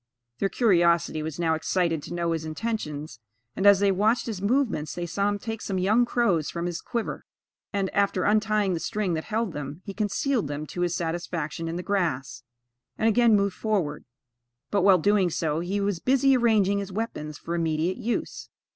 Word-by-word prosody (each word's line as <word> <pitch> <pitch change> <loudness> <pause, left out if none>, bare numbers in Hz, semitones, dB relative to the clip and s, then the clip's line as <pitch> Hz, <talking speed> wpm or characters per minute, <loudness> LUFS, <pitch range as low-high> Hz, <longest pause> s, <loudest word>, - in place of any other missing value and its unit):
Their 195 - +1
curiosity 170 -7 +2
was 155 -1 -5
now 165 -2 +2
excited 165 0 0
to - - -8
know 170 -1 0
his 165 -1 -2
intentions; 155 - -4 0.4
and, 195 - +2
as 200 -1 +7
they 200 -1 +4
watched 215 +5 +2
his 215 -5 -4
movements, 210 - 0
they 175 - -3
saw 200 +4 0
him 205 - -1
take 225 +1 -5
some 195 - -3
young 215 +6 +3
crows 195 -11 +1
from 170 0 -4
his 175 0 -3
quiver, 235 -2 -4 0.5
and, 200 -2 0
after 200 -2 +1
untying 210 -2 +2
the 170 - -1
string 200 0 -1
that 160 -1 -3
held 220 -4 -2
them, 145 +4 -6
he 200 - -6
concealed 215 - 0
them 145 +1 -4
to 175 - -6
his 175 -1 0
satisfaction 165 -1 -3
in 165 - -3
the 180 - -4
grass, 135 - -1 0.6
and 225 - +2
again 230 0 +5
moved 200 -2 +1
forward; 185 -9 -1 0.7
but, 200 - +2
while 190 0 +6
doing 195 +1 +3
so, 160 -2 -1
he 185 +4 -2
was 200 -3 -1
busy 270 +3 +3
arranging 215 -5 +3
his 200 -1 -5
weapons 170 -8 -4
for 170 - -5
immediate 165 +2 0
use. 240 -1 -3
185 Hz, 190 wpm, -26 LUFS, 165-210 Hz, 0.7 s, as